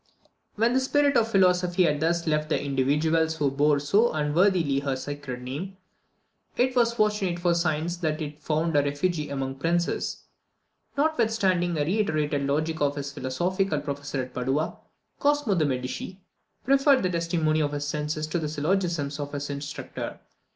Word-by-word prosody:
When 230 +3 +2
the 260 - +4
spirit 285 +2 +2
of 225 -1 +4
philosophy 180 -2 +3
had 150 -3 +2
thus 170 +2 +1
left 150 -1 0
the - - +1
individuals 150 +4 +1
who 145 -3 0
bore 145 +1 +3
so 200 +12 +3
unworthily 155 -1 +2
her 140 -1 -1
sacred 130 -2 -6
name, 165 +10 -6 0.8
it 255 +1 +2
was 235 -2 +4
fortunate 210 -5 +1
for 175 0 +2
science 170 0 0
that 155 -3 -1
it 150 -1 -6
found 160 +2 0
a 145 - +6
refuge 145 +5 -1
among 135 -1 -3
princes. 170 +4 -1 0.7
Notwithstanding 220 - +1
the 145 -2 0
reiterated 155 -7 0
logic 155 +3 -1
of 145 0 +1
his 140 -1 -4
philosophical 175 +6 -1
professor 140 -2 -4
at 125 0 -10
Padua, 135 +5 -1 0.4
Cosmo 290 -6 +2
de 165 -5 +2
Medici 130 +8 -4 0.5
preferred 275 0 +4
the 185 - +1
testimony 165 -2 +1
of 145 -1 0
his 145 0 -2
senses 150 +1 -2
to 155 +3 -2
the 155 -2 -3
syllogisms 155 -2 -1
of 145 0 -5
his 145 0 -4
instructor. 140 +1 -6
155 Hz, 160 wpm, -26 LUFS, 145-185 Hz, 0.8 s, a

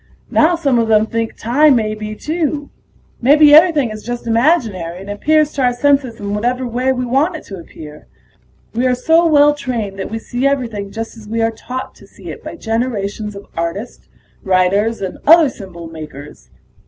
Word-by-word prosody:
Now 330 +3 +4
some 275 -7 +1
of 230 - +1
them 215 -1 +4
think 230 0 -3
time 275 +5 +3
may 215 -2 0
be, 215 0 -6
too. 300 +1 -3 0.5
Maybe 295 +4 +6
everything 305 -7 +5
is 215 0 -7
just 240 +2 -6
imaginary, 225 - 0
and 195 +2 -8
appears 305 +8 +1
to 275 - -2
our 250 -1 +2
senses 270 -2 +1
in 200 0 -4
whatever 245 +5 -1
way 250 +2 0
we 250 -1 -2
want 280 +8 +1
it 315 - -8
to 195 - -8
appear. 150 -3 -12 0.7
We 245 +3 +1
are 250 - +2
so 325 +7 +3
well 295 -1 +5
trained 230 -9 -4
that 190 - -4
we 225 - -4
see 245 +4 -2
everything 230 -8 -2
just 225 +2 -6
as 215 -2 -13
we 225 +1 -1
are 225 - +1
taught 255 +3 -7
to - - -18
see - - -10
it - - -11
by - - -7
generations 220 -3 -3
of 200 - -10
artists, 170 +8 -5 0.3
writers, 195 +4 +1
and 190 -2 -5
other 325 -1 +7
symbol 185 -8 -10
makers. 150 -3 -11
230 Hz, 190 wpm, -17 LUFS, 205-280 Hz, 0.7 s, other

